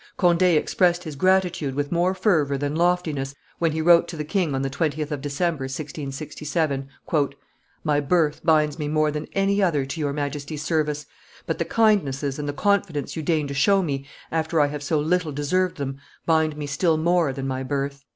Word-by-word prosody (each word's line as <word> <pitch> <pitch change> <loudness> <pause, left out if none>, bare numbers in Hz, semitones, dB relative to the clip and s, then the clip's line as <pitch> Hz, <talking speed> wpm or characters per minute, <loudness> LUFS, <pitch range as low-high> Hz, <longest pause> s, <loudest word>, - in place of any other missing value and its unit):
Conde 175 -2 +3
expressed 175 +1 +3
his 155 -4 -6
gratitude 180 -4 +1
with 145 0 -2
more 175 +2 +2
fervor 160 -8 +2
than 145 +2 -2
loftiness 160 -6 0 0.2
when 165 -1 +2
he 160 +1 -2
wrote 170 0 +6
to 165 - -7
the 150 - -2
king 160 -3 0
on 135 - -1
the 135 - -1
20th 150 +1 -1
of 145 -2 -3
December, 145 0 -1
1667, 145 +1 -3 1.0
"My 150 -2 +2
birth 150 0 +1
binds 155 -1 +3
me 150 - -2
more 155 0 +2
than 150 +1 -4
any 200 +1 +2
other 155 -8 +2
to 135 +5 -5
your 145 -2 0
Majesty's 145 +1 -4
service, 150 -2 0 0.4
but - - -2
the - - 0
kindnesses 150 -11 +1
and 145 0 -3
the - - +1
confidence 175 -4 0
you 160 - -3
deign 155 -1 0
to 140 - -4
show 195 +8 +3
me 140 -4 -3 0.2
after 160 0 0
I 145 - +5
have 145 0 -5
so 150 +2 0
little 165 +1 0
deserved 170 +6 0
them 135 -1 -4 0.3
bind 160 -2 +2
me 150 - -4
still 155 +3 +1
more 170 -2 +2
than 135 0 -5
my 130 0 -2
birth. 140 +1 -3
150 Hz, 190 wpm, -24 LUFS, 145-170 Hz, 1.0 s, wrote